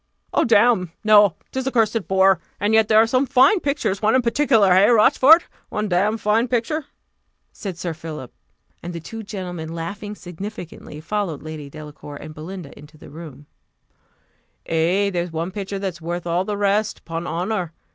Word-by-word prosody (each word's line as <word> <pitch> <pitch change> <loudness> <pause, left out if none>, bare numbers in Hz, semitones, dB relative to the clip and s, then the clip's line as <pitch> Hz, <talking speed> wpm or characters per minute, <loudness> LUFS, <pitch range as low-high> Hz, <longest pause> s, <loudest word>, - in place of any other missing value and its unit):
"Oh, - - +3
damme! 220 -6 +3
no 210 -4 +6 0.2
'tis 260 0 -3
a - - 0
cursed 225 -3 +1
bore; 190 -1 +4 0.2
and 205 +2 0
yet 220 -1 +4
there 215 - +4
are 220 - +7
some 255 +4 +1
fine 270 - +5
pictures: 280 - -2
one 220 +3 +3
in 260 - +3
particular 230 -6 +3
hey, 190 +4 +5
Rochfort? 260 +8 +6 0.3
one 210 0 -2
damned 205 +5 +1
fine 220 +3 +2
picture!" 255 +6 -1 0.7
said 190 -5 -7
Sir 170 -1 -4
Philip. 155 -5 -8 0.5
And 175 +1 -7
the 170 - -5
two 225 +8 -8
gentlemen 180 -6 -6
laughing 200 +5 -6
significantly, 180 -4 -9
followed 170 -3 -3
Lady 155 -2 -8
Delacour 150 0 -10
and 155 +2 -9
Belinda 160 0 -9
into 150 +1 -15
the 145 - -14
rooms. 150 -2 -11 1.2
"Ay, 175 +5 +1
there's 175 0 -2
one 165 +3 -3
picture 200 0 -5
that's 190 -3 -5
worth 175 +1 -4
all 175 +2 0
the 205 0 -3
rest, 205 +1 0
'pon 165 +1 -5
honour!" 180 +1 -2
195 Hz, 170 wpm, -21 LUFS, 165-220 Hz, 1.2 s, are